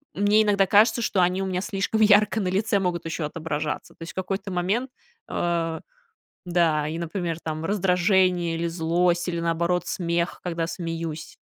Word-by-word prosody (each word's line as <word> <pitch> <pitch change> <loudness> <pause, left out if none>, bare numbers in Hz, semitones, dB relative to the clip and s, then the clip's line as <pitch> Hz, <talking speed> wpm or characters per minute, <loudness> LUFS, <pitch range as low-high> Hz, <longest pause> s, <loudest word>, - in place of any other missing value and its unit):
мне 205 +2 +4
иногда 200 -2 +3
кажется, 220 +4 +4
что 190 -3 +1
они 180 +2 +2
у - - -2
меня 185 -1 -2
слишком 205 +1 -1
ярко 210 +1 +5
на 190 - -1
лице 200 +3 +1
могут 175 -3 -2
ещё 165 -1 -3
отображаться. 150 -1 -4
То - - -33
есть, 165 - -6
в - - -44
какой-то 195 +1 -3
момент 195 +9 -1 0.4
А, 165 -2 -1 0.7
да, 165 -4 +2
и, 160 - -4
например, 170 -1 -3
там 155 0 -4
раздражение 180 -2 +2
или 170 +1 -1
злость 170 +1 +1
или 170 -1 -2
наоборот 170 +1 0
смех, 170 -1 -2
когда 170 -2 -2
смеюсь. 165 -3 -5
175 Hz, 165 wpm, -25 LUFS, 165-195 Hz, 0.7 s, ярко